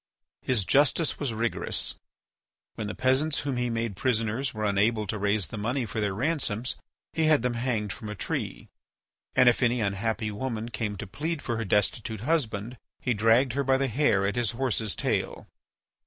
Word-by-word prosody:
His 120 -7 +1
justice 145 - +3
was 140 -5 -1
rigorous. 115 +1 -1 0.8
When 110 - -4
the 105 - -4
peasants 135 +4 +2
whom 135 -3 -2
he 125 0 0
made 115 -3 -2
prisoners 115 +3 0
were 110 -1 -3
unable 105 +2 +2
to 105 +2 -3
raise 100 -4 +1
the 105 - -5
money 120 +4 -1
for 110 0 -3
their 100 -2 0
ransoms 125 -3 0 0.4
he 160 - +1
had 155 -5 +4
them 125 -1 +1
hanged 120 -4 -1
from 110 - -8
a 105 - -4
tree, 95 - -4 0.7
and 125 - +6
if 120 - +5
any 125 0 +3
unhappy 110 +2 -1
woman 115 +1 -3
came 105 -2 -3
to - - -5
plead 155 - -3
for 120 -2 -2
her 115 - -2
destitute 105 +2 0
husband 120 -5 -1 0.2
he 125 - 0
dragged 115 +4 +4
her 140 +1 0
by 135 0 +3
the 135 0 +1
hair 115 -6 +2
at 100 - 0
his 120 -3 +2
horse's 115 - 0
tail. - - -2
115 Hz, 185 wpm, -27 LUFS, 105-130 Hz, 0.8 s, and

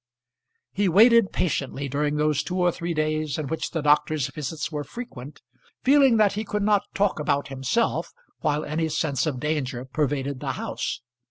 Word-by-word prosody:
He 200 -1 +1
waited 225 +3 +6
patiently 140 -4 -2
during 145 +2 -1
those 150 -1 +1
two 180 - -4
or 180 -1 +3
three 170 0 -4
days 155 -1 -1
in 155 - -3
which 160 - -2
the 160 -3 -3
doctor's 150 -1 +2
visits 150 +3 -5
were 150 -1 -3
frequent, 145 - -9 0.4
feeling 270 -3 +5
that 210 -2 +4
he 210 +2 -2
could 210 -1 -2
not 205 -1 +2
talk 200 -4 +1
about 145 -1 0
himself 135 - -1 0.3
while 150 0 0
any 160 +2 -1
sense 150 -1 0
of 135 -5 -2
danger 135 -4 -2
pervaded 140 -1 -2
the - - -3
house. - - -4
155 Hz, 170 wpm, -25 LUFS, 145-190 Hz, 0.4 s, waited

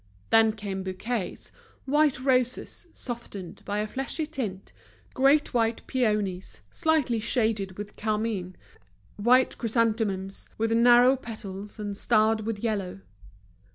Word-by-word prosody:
Then 225 -1 +5
came 200 -3 -5
bouquets, 190 +3 -4 0.3
white 295 -1 +3
roses, 255 +4 0
softened 230 -7 -7
by 205 - -2
a 210 +1 -1
fleshy 270 +7 -3
tint, 220 - -5 0.4
great 275 +3 +3
white 230 -1 0
peonies, 210 -7 -1
slightly 310 -8 +1
shaded 220 -4 0
with 205 0 -7
carmine, 210 -4 -2 0.6
white 250 +5 +3
chrysanthemums, 220 -4 -1
with 225 +1 0
narrow 240 +3 +6
petals 210 -5 -8
and 205 -2 -4
starred 220 0 +2
with 225 -2 -3
yellow. 200 - -2
225 Hz, 115 wpm, -27 LUFS, 205-245 Hz, 0.6 s, narrow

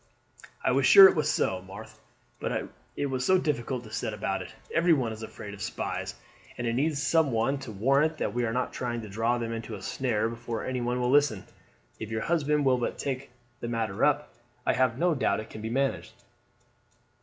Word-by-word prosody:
"I - - +2
was 135 +1 +3
sure 195 -1 +11
it - - +2
was 155 -3 +1
so, 95 -1 0
Marthe, 100 +4 -11 0.4
but - - -2 0.3
it - - 0
was 130 -2 -2
so 185 +7 +4
difficult 130 -7 -2
to 110 - -12
set 115 -1 -3
about 95 -2 -2
it. 90 - -8 0.2
Everyone 160 -9 +3
is 110 - -9
afraid 105 -2 -8
of 100 - -10
spies, 110 - -4 0.4
and 120 - -3
it 115 - 0
needs 145 +4 0
some 160 -2 +3
one 120 +5 +1
to 135 -4 -8
warrant 140 +9 +2
that 100 - -2
we 120 +1 0
are 115 - 0
not 125 +2 -2
trying 120 -2 -3
to 110 - -9
draw 115 +4 0
them 115 -1 -3
into 115 -1 -5
a 100 - -9
snare, 115 -3 0
before 115 0 -5
anyone 125 -1 -1
will 125 0 +1
listen. 140 -8 +3 0.6
If 110 - -5
your 110 -1 -2
husband 150 -2 +1
will 130 -2 +3
but 120 - -2
take 135 -1 -4 0.3
the - - -5
matter 115 -3 -2
up, 150 0 +2 0.3
I - - +3
have 130 -2 +2
no 175 +3 +2
doubt 135 - +1
it 110 - -8
can 110 - -8
be 110 - -4
managed." 135 +3 -1
120 Hz, 210 wpm, -28 LUFS, 110-140 Hz, 0.6 s, sure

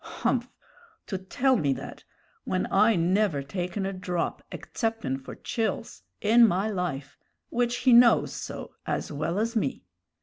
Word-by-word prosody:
Humph! - - +1 0.6
to 190 - -4
tell 255 +8 +1
me 140 -7 +1
that, - - -8 0.4
when 185 0 -1
I 215 +3 +5
never 175 -3 +1
taken 180 +6 -3
a 195 - -2
drop, 180 -2 -3
exceptin' 225 - -3
for - - -8
chills, 225 -2 -3 0.2
in 230 +2 +6
my 200 +3 0
life 160 -8 -4 0.3
which 240 0 0
he 255 - +7
knows 235 0 +6
so - - -7
as - - -2
well 155 +5 -2
as 230 +3 -1
me!" 220 - -1
195 Hz, 145 wpm, -27 LUFS, 175-225 Hz, 0.6 s, he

